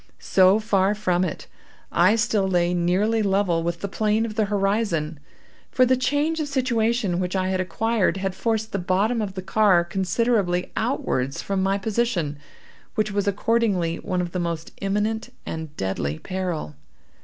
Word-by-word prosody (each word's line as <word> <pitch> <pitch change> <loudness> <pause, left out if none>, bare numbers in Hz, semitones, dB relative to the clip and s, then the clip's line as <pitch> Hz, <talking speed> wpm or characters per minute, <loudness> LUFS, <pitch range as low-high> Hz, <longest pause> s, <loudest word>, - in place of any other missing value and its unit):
So 190 +1 +4
far 205 -2 +2
from 185 -4 +1
it, 175 - -4 0.5
I 185 +6 +4
still 220 -4 +1
lay 175 -1 +2
nearly 190 +6 +1
level 195 -4 +1
with 170 0 -3
the 200 - -2
plane 215 +2 +1
of 220 - -5
the 215 0 +1
horizon; 195 -6 0 0.5
for 255 - +4
the 255 +1 +3
change 290 +5 0
of 305 - -1
situation 235 -7 0
which 180 +1 -2
I 185 0 0
had 185 -1 0
acquired, 195 +1 0
had 190 -1 -2
forced 220 +2 -1
the 200 - -1
bottom 200 +6 +1
of 200 -2 -4
the 185 - -5
car 190 -3 +4
considerably 190 0 0
outwards 135 - -1
from 195 -1 -1
my 195 +1 +1
position, 200 -8 -1 0.6
which 215 -1 0
was 205 0 -1
accordingly 200 -5 +1
one 180 -1 -2
of 175 -1 -4
the 180 - -2
most 170 -2 -3
imminent 210 +4 -1
and 160 -2 -6
deadly 80 -6 -2
peril. 180 - -4
195 Hz, 165 wpm, -24 LUFS, 180-220 Hz, 0.6 s, So